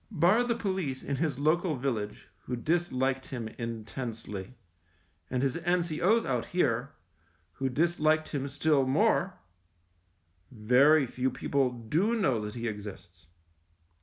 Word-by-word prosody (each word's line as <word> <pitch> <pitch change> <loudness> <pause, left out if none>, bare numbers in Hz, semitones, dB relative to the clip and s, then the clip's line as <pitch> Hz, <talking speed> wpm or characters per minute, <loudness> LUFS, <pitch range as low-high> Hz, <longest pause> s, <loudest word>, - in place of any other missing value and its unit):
Bar 200 +5 +3
the 235 -1 0
police 190 - -2
in 140 0 -2
his 150 -4 -1
local 155 +3 +2
village, 120 -6 -3 0.2
who 125 - -2
disliked 135 -2 0
him 120 -4 -5
intensely, 115 -2 -6 0.7
and 125 0 -1
his 135 +1 0
N.C.O.'s 175 +5 +1
out 125 -3 -1
here, 135 -7 0 0.6
who 135 +8 -2
dis 165 +7 0
liked 155 +1 +2
him 140 -2 -2
still 145 -1 +2
more, 190 +4 +2 1.1
very 130 +6 +4
few 125 +1 -1
people 135 +1 0
do 150 - 0
know 130 - +2
that 105 +1 -6
he 120 0 -3
exists. 100 -6 -8
135 Hz, 130 wpm, -29 LUFS, 120-170 Hz, 1.1 s, very